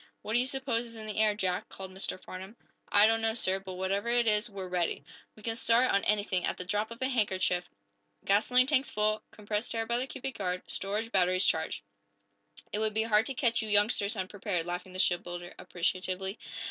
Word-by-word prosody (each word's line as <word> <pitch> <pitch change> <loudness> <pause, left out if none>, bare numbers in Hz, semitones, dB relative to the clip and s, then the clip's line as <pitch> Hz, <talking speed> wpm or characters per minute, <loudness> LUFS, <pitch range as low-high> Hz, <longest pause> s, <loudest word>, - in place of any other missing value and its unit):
"What 215 - -3
do 240 - +5
you 250 - +1
suppose 260 -3 -1
is 230 - -8
in 220 - -7
the 215 -1 -5
air, 215 -1 +4
Jack?" 185 -3 -1
called 190 -1 -8
Mr. 190 0 -2
Farnum. 190 +4 -9 0.4
"I 205 +1 +7
don't 225 +1 +3
know, 225 0 +1
sir. 190 -4 +2
But 190 -1 -8
whatever 195 +4 -1
it 240 0 +3
is, 215 +1 +2
we're 195 -2 -6
ready. 180 -2 -1 0.3
We 215 - -16
can 225 0 0
start, 235 +2 +3
on 200 - +2
anything, 205 -3 +1
at - - -1
the 180 - -5
drop 210 +3 -1
of 230 0 -9
a - - +3
handkerchief. 190 -7 +1 0.6
Gasoline 250 +6 +4
tanks 275 0 +2
full, 215 0 +1
compressed 210 +2 -3
air 225 0 0
by 235 +1 +1
the 260 - -1
cubic 265 -3 -6
yard, 180 -2 -2
storage 210 +4 -3
batteries 185 -1 +3
charged." 160 -9 0 0.9
"It 210 - 0
would 215 -1 0
be 220 - +3
hard 220 0 +3
to 270 - -4
catch 235 -4 +2
you 220 - -4
youngsters 205 0 +3
unprepared," 190 -2 -2
laughed 180 +1 -4
the 185 - -7
shipbuilder, 175 -1 -1
appreciatively. 185 +3 -2
210 Hz, 210 wpm, -30 LUFS, 185-230 Hz, 0.9 s, I